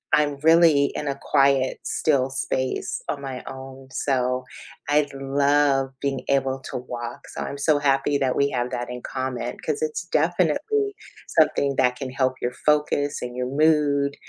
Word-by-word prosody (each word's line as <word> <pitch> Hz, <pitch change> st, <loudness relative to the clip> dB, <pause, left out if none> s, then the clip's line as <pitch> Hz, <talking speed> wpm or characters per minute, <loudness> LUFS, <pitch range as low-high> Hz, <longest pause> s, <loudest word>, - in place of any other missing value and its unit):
I'm 145 Hz, -2 st, +1 dB
really 160 Hz, -3 st, +6 dB
in 150 Hz, -, -3 dB
a 140 Hz, 0 st, -2 dB
quiet, 135 Hz, -1 st, +2 dB
still 135 Hz, -4 st, +1 dB
space 130 Hz, -1 st, -2 dB
on 140 Hz, -, -2 dB
my 130 Hz, -2 st, -6 dB
own, 130 Hz, 0 st, -9 dB
so 125 Hz, -2 st, 0 dB, 0.4 s
I'd 145 Hz, -1 st, +2 dB
love 135 Hz, 0 st, +2 dB
being 135 Hz, -2 st, -1 dB
able 135 Hz, -1 st, +1 dB
to -, -, -3 dB
walk, 120 Hz, -1 st, -7 dB
so -, -, -6 dB
I'm 140 Hz, -, -4 dB
so 145 Hz, +1 st, +2 dB
happy 140 Hz, 0 st, +2 dB
that 130 Hz, -2 st, +1 dB
we 140 Hz, 0 st, +2 dB
have 125 Hz, -1 st, -1 dB
that 120 Hz, 0 st, -4 dB
in 125 Hz, 0 st, -6 dB
common 130 Hz, -2 st, -4 dB
'cause 445 Hz, +1 st, -1 dB
it's 455 Hz, -1 st, -2 dB
definitely 425 Hz, -2 st, +1 dB, 0.3 s
something 150 Hz, -3 st, +2 dB
that 125 Hz, -1 st, +3 dB
can 130 Hz, -2 st, -5 dB
help 130 Hz, -1 st, +1 dB
your 120 Hz, -, -1 dB
focus 150 Hz, -1 st, +1 dB
and 125 Hz, 0 st, -6 dB
your 125 Hz, 0 st, -2 dB
mood, 145 Hz, -1 st, +2 dB
135 Hz, 165 wpm, -24 LUFS, 130-145 Hz, 0.4 s, really